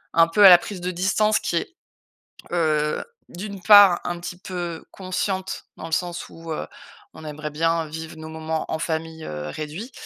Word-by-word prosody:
un 165 0 +6
peu, 200 +5 +5
à 190 - +12
la 175 - +10
prise 195 -1 -7
de 180 +1 -2
distance 210 +4 +2
qui 170 - -3
est, 340 - -4 0.8
heu, 155 -3 +1 0.3
d'une 200 +1 -7
part, 205 -3 +8
un 175 0 -3
petit 175 +1 -7
peu 175 -3 -5
consciente, 190 0 -3
dans - - -8
le 160 - -7
sens 175 0 -2
où, 165 0 -9
heu, - - -5 0.5
on - - -12
aimerait 150 0 -6
bien 165 +2 +1
vivre 160 +1 -8
nos 160 - -8
moments 160 0 -3
en 160 - -1
famille, 160 0 -3
heu, 75 0 -5
réduit, 155 - -6
170 Hz, 185 wpm, -23 LUFS, 160-185 Hz, 0.8 s, à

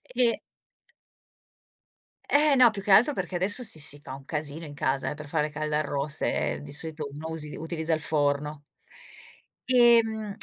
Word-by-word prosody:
E 240 -2 +2 1.9
Eh. - - -2 0.2
No 250 -2 +7
più 200 -2 -6
che 195 - -2
altro 245 +9 +6
perché 185 -3 -4
adesso 200 +7 +2
si 180 -8 +2
si 145 0 -2
fa 140 - -9
un 135 0 -13
casino 155 +1 -5
in 145 - -9
casa 135 -1 -1
eh, - - -4
per 150 +1 -10
le 145 - -12
fare 150 -2 0
caldarroste, 150 -1 0 0.2
ehm, - - -8
di 145 - -10
solito 155 0 -3
uno 155 +3 -8
usi 155 -2 -4
utilizza 160 0 -3
il 155 - 0
forno. 145 0 -1 1.1
Ehm, 225 -4 +3
155 Hz, 165 wpm, -26 LUFS, 145-200 Hz, 1.9 s, No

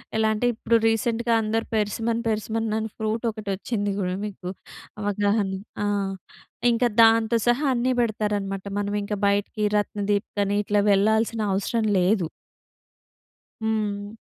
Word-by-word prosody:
ఎలా 220 0 +3
అంటే 215 +3 -1
ఇప్పుడు, 230 +1 0
రీసెంట్‍గా 230 +1 +1
అందరూ 220 +1 -1
పెర్సిమన్ 225 +2 0
పెర్సిమన్ 220 0 -1
ఫ్రూట్ 220 +1 -2
ఒకటి 215 -2 -7
వచ్చింది 205 0 -2
కూడా 180 -1 -1
మీకు 190 -3 -6 0.5
అవగాహన 205 0 +1 0.3
ఆ! - - 0 0.9
ఇంకా 240 +1 +2
దాంతో 225 0 +5
సహా 245 +5 +3
అన్నీ 250 +1 +1
పెడతారనమాట 205 -3 -2
మనం 205 0 -2
ఇంకా 205 0 -3
బయటికి 205 +1 0
రత్నదీప్ 205 0 -1
అని 200 +1 0
ఇట్లా 205 0 +2
వెళ్ళాల్సిన 220 +3 +2
అవసరం 220 +3 0
లేదు. 180 -2 +2 1.4
హ్మ్. 210 -1 -2
215 Hz, 120 wpm, -24 LUFS, 205-225 Hz, 1.4 s, దాంతో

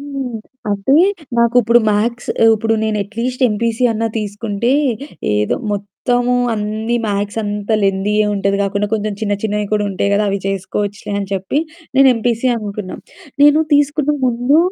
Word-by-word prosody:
హ్మ్. 275 -5 -5 0.3
అంటే, 205 +8 +2 0.4
నాకు 235 0 +3
ఇప్పుడు 235 +2 +4
మ్యాథ్స్ 235 +3 -1 0.2
ఇప్పుడు 225 +1 0
నేను 215 -1 -1
అట్‌లీస్ట్ 235 +6 -4
ఎంపీసీ 230 +3 -1
అన్నా 225 +1 -1
తీసుకుంటే 210 +2 -2 0.6
ఏదో 105 0 0 0.2
మొత్తము 245 +5 -1 0.2
అన్నీ 215 +2 -2
మ్యాథ్స్ 205 +1 -2
అంతా 205 +1 -2
లెంథీయే 200 +2 +1
ఉంటది. 200 0 0
గాకుండా 200 +1 -1
కొంచెం 215 -1 -2
చిన్న 205 -1 +1
చిన్నయి 210 -1 -1
కూడా 210 -1 +2
ఉంటాయి 195 +1 -1
గదా! 210 +1 +1
అవి 200 - -1
చేసుకోవచ్చులే 205 +2 -3
అని 195 - -5
చెప్పి 195 +8 -1 0.4
నేను 270 0 +7
ఎంపీసీయే 235 +2 0
అనుకున్నాం. 205 -2 -6 0.4
నేను 295 +1 +6 0.2
తీసుకునే 290 +1 +2
ముందు 245 +5 +2
215 Hz, 145 wpm, -17 LUFS, 205-240 Hz, 0.6 s, నేను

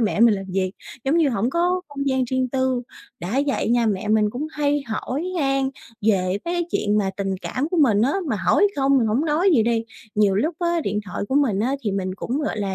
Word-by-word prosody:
mẹ 215 -1 0
mình 230 -3 +6
làm 195 0 -5
việc, 185 0 -1 0.3
giống 285 +5 +2
như 320 -4 +4
hổng 235 0 0
có 355 +4 +1
không 280 -1 -3
gian 260 -1 +1
riêng 255 +1 -1
tư. 260 -1 0 0.4
Đã 210 +11 0
vậy 275 - 0
nha 235 -1 +3
mẹ 205 -1 -1
mình 215 -1 +3
cũng 275 +7 -4
hay 290 -1 0
hỏi 250 +7 -3 0.2
han 270 -1 +1 0.4
về 185 -3 +2
mấy 345 0 -1
chuyện 210 0 +1
mà 195 -2 0
tình 195 -1 -1
cảm 280 +5 -2
của 360 - -2
mình 225 -9 +4
á, 275 +4 +2 0.2
mà 220 - 0
hỏi 190 - +3
không 275 0 +3
mình 230 - +2
hổng 240 +9 +1
nói 330 +5 +2
gì 225 - +4
đi, 230 0 0 0.3
nhiều 205 -2 +3
lúc 310 - 0
á, 345 -2 0
điện 210 -5 -1
thoại 190 +1 -4
của 265 - -1
mình 240 -9 +2
á, 260 +5 +1
thì 205 -3 -1
mình 190 -1 -2
cũng, 255 +5 -3
gọi 295 - -2
là, 195 -2 -2
245 Hz, 240 wpm, -22 LUFS, 210-285 Hz, 0.4 s, mình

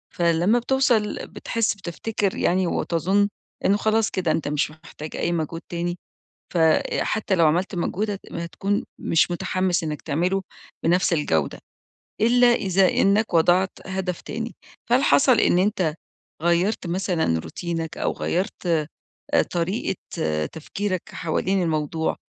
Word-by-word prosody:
فلمّا 175 +6 +3
بتوصل 240 -4 +1
بتحس 230 -2 -1
بتفتكر 195 +2 -2
يعني 185 0 +2
وتظن 190 +6 +1 0.4
إنه 200 +2 +4
خلاص 220 +1 +2
كده 175 -4 0
أنت 155 -1 -1
مش 150 +1 0
محتاج 155 -1 -10
أي 170 - -1
مجهود 165 0 -2
تاني 175 +1 -2 0.6
فحتى 175 +5 +2
لو 165 -3 +4
عملت 180 +6 +1
مجهود 205 +4 -1
هت 200 - -4
هتكون 180 +4 -2 0.2
مش 165 +2 +2
متحمس 185 0 0
إنك 150 -2 -4
تعمله 180 +6 0 0.4
بنفس 175 +2 +3
الجودة، 80 - 0 0.6
إلا 245 +2 +5
إذا 190 -3 +3
إنك 200 0 +2
وضعت 180 +3 +4
هدف 190 -2 -3
تاني. 230 +1 -5 0.3
فهل 255 +3 +4
حصل 255 -5 +5
إن 175 - +4
أنت 185 -5 +1 0.5
غيّرت 175 +4 +1
مثلًا 170 - 0
روتينك 165 - -4
أو - - 0
غيّرت 175 -4 -1 0.7
طريقة 180 +3 -1 0.6
تفكيرك 185 +3 -3
حوالين 185 +3 0
الموضوع 160 0 -1
180 Hz, 125 wpm, -24 LUFS, 165-200 Hz, 0.7 s, إلا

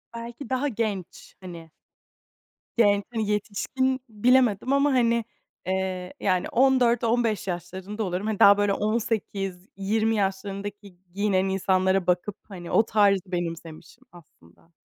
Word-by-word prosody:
Belki 235 +3 -8
daha 260 +2 0
genç, 210 -7 -4
hani. 170 -3 -10 1.1
Genç, 205 -3 +4
hani, 220 -2 -1
yetişkin 255 +6 -1
bilemedim 245 +2 +2
ama, 280 +1 +3
hani, 235 -2 +2 0.4
eee, 185 -1 -3
ya, 190 - +2
hani 180 - -2
14-15 240 -4 +2
yaşlarında 190 +4 -5
oluyorum. 185 +3 -3
Hani, 215 -2 -2
daha 200 0 +8
böyle 205 -1 +2
18-20 210 -1 -2
yaşlarındaki 200 0 -4 0.2
giyinen 195 -2 +1
insanlara 190 -1 +1
bakıp, 180 +3 0
hani, 175 -3 -8
o 220 - +5
tarzı 200 -3 +3
benimsemişim 165 +4 -6
aslında. 165 - -20
200 Hz, 115 wpm, -25 LUFS, 185-230 Hz, 1.1 s, daha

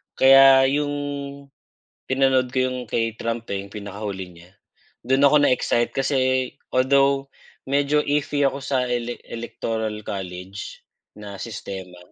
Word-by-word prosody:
Kaya 135 +1 +7 0.2
'yung, 145 +1 0 1.2
pinanood 130 -1 +2
ko 130 - -2
'yung 130 0 -3
kay 115 -1 0
Trump, 115 0 -4
eh, 100 - -3
'yung 100 - -13
pinakahuli 100 -2 -6
niya, 85 +1 -17 0.6
doon 135 +2 +4
ako 150 - +4
na-excite 125 -3 +1
kasi 135 0 0 0.6
although 135 +1 +3 0.4
medyo 145 +1 +2
iffy 145 0 0
ako 135 0 +1
sa 130 -1 0
Elec 120 0 -3
Electoral 115 -2 -4
College, 95 0 -7 0.3
na 100 -2 -9
sistema. 95 -5 -7
120 Hz, 125 wpm, -23 LUFS, 105-135 Hz, 1.2 s, Kaya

